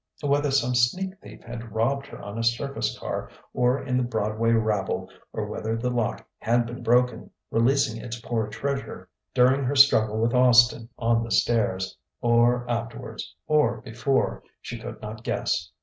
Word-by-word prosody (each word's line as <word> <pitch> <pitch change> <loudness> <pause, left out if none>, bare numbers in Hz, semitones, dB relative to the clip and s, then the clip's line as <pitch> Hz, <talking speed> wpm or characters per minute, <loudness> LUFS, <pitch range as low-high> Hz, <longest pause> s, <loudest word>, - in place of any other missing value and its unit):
Whether 145 0 +2
some 125 -2 +2
sneak 185 +11 +1
thief 105 +1 -13
had 115 -1 -8
robbed 135 +5 0
her - - -10
on 100 +2 -7
a - - -1
surface 120 +4 -1
car - - -4 0.2
or 125 +2 +2
in 125 -2 -1
the 125 - +2
Broadway 110 -1 -1
rabble, 110 -3 0 0.2
or - - -3
whether 110 +1 -3
the 125 +2 -1
lock 120 -3 -2
had 120 +1 +2
been 120 +1 -7
broken, 125 +2 +2 0.2
releasing 115 -1 +2
its 120 -1 -6
poor 115 -2 -2
treasure, 140 +5 -4 0.3
during 130 +3 +4
her 135 +3 -1
struggle 110 -6 +5
with 115 +2 +1
Austin 120 -2 +5
on 115 0 +2
the 115 - -6
stairs 105 -5 +1 0.2
or 120 +1 +3
afterwards 115 -1 -5
or 150 -7 +2
before 125 +3 -1 0.2
she - - -7
could - - -8
not 110 +1 -7
guess. 85 -7 -1
120 Hz, 165 wpm, -25 LUFS, 115-125 Hz, 0.3 s, struggle